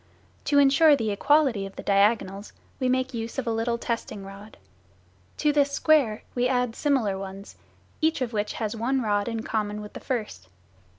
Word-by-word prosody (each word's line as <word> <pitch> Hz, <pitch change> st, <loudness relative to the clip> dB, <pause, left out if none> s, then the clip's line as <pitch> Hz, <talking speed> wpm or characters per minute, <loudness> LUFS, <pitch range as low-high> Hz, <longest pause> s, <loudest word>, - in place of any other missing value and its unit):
To 285 Hz, -, +2 dB
ensure 285 Hz, +2 st, +6 dB
the 225 Hz, -5 st, -2 dB
equality 265 Hz, -1 st, +2 dB
of 195 Hz, -, -14 dB
the -, -, -8 dB
diagonals, 200 Hz, 0 st, +1 dB, 0.3 s
we 255 Hz, -2 st, +1 dB
make 255 Hz, 0 st, 0 dB
use 230 Hz, +1 st, -5 dB
of 265 Hz, -, -2 dB
a 230 Hz, -, -1 dB
little 230 Hz, +1 st, -1 dB
testing 230 Hz, -4 st, -4 dB
rod. 200 Hz, +2 st, -12 dB, 0.8 s
To 300 Hz, -1 st, +2 dB
this 285 Hz, -1 st, +2 dB
square 280 Hz, -9 st, +2 dB
we 250 Hz, 0 st, +1 dB
add 250 Hz, -2 st, 0 dB
similar 240 Hz, -10 st, 0 dB
ones, 195 Hz, +1 st, -9 dB, 0.5 s
each 315 Hz, -1 st, +2 dB
of 250 Hz, -3 st, -3 dB
which 210 Hz, -1 st, -2 dB
has 220 Hz, -1 st, -3 dB
one 255 Hz, +3 st, 0 dB
rod 205 Hz, -2 st, 0 dB
in 225 Hz, -1 st, -3 dB
common 210 Hz, -2 st, -2 dB
with 210 Hz, 0 st, -9 dB
the -, -, -7 dB
first. 210 Hz, -, -4 dB
230 Hz, 180 wpm, -26 LUFS, 205-265 Hz, 0.8 s, ensure